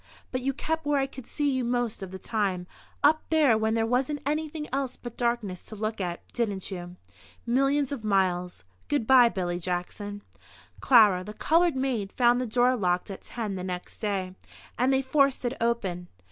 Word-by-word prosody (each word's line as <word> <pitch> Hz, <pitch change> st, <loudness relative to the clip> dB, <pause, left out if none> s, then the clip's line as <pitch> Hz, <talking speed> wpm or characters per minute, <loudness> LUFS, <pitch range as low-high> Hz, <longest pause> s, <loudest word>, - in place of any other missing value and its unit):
But 255 Hz, -, -2 dB
you 270 Hz, +2 st, 0 dB
kept 320 Hz, +4 st, -2 dB
where 290 Hz, -1 st, +1 dB
I 270 Hz, -, +2 dB
could 265 Hz, -2 st, -10 dB
see 290 Hz, -2 st, 0 dB
you 260 Hz, -1 st, 0 dB
most 240 Hz, -3 st, -1 dB
of 190 Hz, -, -5 dB
the 190 Hz, -, -7 dB
time 190 Hz, -3 st, -1 dB, 0.4 s
up 310 Hz, +2 st, +5 dB
there 300 Hz, -7 st, +4 dB
when 220 Hz, +1 st, +1 dB
there 225 Hz, 0 st, +2 dB
wasn't 265 Hz, +5 st, 0 dB
anything 305 Hz, +1 st, -2 dB
else 270 Hz, -2 st, -2 dB
but 240 Hz, -1 st, -9 dB
darkness 235 Hz, -7 st, -1 dB
to 215 Hz, -, -11 dB
look 215 Hz, 0 st, -3 dB
at, 175 Hz, -2 st, -4 dB
didn't 205 Hz, -5 st, -2 dB
you?... 175 Hz, -1 st, -6 dB, 0.5 s
Millions 275 Hz, +3 st, +2 dB
of 270 Hz, -6 st, -4 dB
miles... 180 Hz, -, 0 dB, 0.2 s
Good 285 Hz, -6 st, 0 dB
bye, 250 Hz, -1 st, +7 dB
Billy 175 Hz, -4 st, -2 dB
Jackson." 185 Hz, +4 st, -4 dB, 0.6 s
Clara, 210 Hz, -8 st, +6 dB
the 210 Hz, +2 st, -8 dB
coloured 335 Hz, +3 st, +3 dB
maid, 250 Hz, -7 st, -1 dB
found 245 Hz, -1 st, +3 dB
the 250 Hz, -, -2 dB
door 245 Hz, +3 st, +3 dB
locked 180 Hz, -3 st, 0 dB
at 195 Hz, -, -8 dB
10 220 Hz, -4 st, -4 dB
the 185 Hz, -1 st, -4 dB
next 180 Hz, -1 st, -6 dB
day, 195 Hz, -4 st, -2 dB, 0.4 s
and 250 Hz, +3 st, +2 dB
they 265 Hz, 0 st, +2 dB
forced 275 Hz, -1 st, +2 dB
it 245 Hz, -, 0 dB
open. 195 Hz, -7 st, -1 dB
235 Hz, 190 wpm, -27 LUFS, 195-265 Hz, 0.6 s, bye